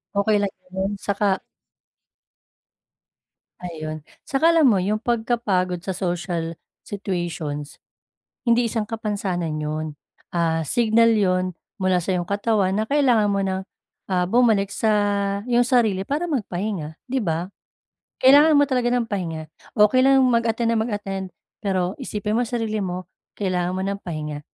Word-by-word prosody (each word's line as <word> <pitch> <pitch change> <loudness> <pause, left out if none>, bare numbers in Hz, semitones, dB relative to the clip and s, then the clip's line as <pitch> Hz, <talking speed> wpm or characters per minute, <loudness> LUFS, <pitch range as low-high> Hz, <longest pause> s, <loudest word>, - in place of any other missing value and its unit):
Okey 205 +1 +3
lang 200 -2 -1 0.2
'yon, 190 +2 -2
saka 200 +1 0 2.4
Ayun, 155 -3 -6 0.2
'tsaka 315 +5 +3
alam 330 -2 +5
mo 195 -4 +3
yung 210 +3 0
pagkapagod 215 -7 0
sa 190 - -2
social 170 -2 -3 0.2
situations, 170 -7 -4 0.7
hindi 235 +1 +4
isang 220 -2 -2
kapansanan 200 -7 -2
'yon, 155 +1 -2 0.5
ah, 165 -2 +1
signal 230 +4 +3
'yon 185 -3 +1 0.2
mula 185 -2 +2
sa 180 +1 -1
iyong 175 - -2
katawan, 200 0 +1
na 215 +2 -1
kailangan 250 -8 +3
mo 200 - +1
ng, 190 0 -1 0.5
ah, 180 -1 +2
bumalik 210 -2 +3
sa 220 -1 +1 0.5
'yong 245 0 +3
sarili 225 -7 +3
para 290 - -2
magpahinga, 195 - -3
di 260 -1 -1
ba? 170 -1 -1 0.7
Kailangan 290 +3 +7
mo 285 - +6
talaga 250 -3 +1
ng 245 -2 +1
pahinga 165 -6 -4 0.3
o 210 - +8
kailangan 265 +3 +4
mo 260 - +4
mag-attend 230 0 0
nang 220 - +2
mag-attend, 200 -4 -3 0.4
pero 190 -1 0
isipin 210 -3 -2
mo 245 - +2
ang 230 - -6
sarili 220 -3 -1
mo 180 0 -4 0.3
kailangan 180 -3 0
mo 185 - -3
ng 200 0 -2
pahinga, 150 -3 -5
200 Hz, 140 wpm, -23 LUFS, 180-230 Hz, 2.4 s, o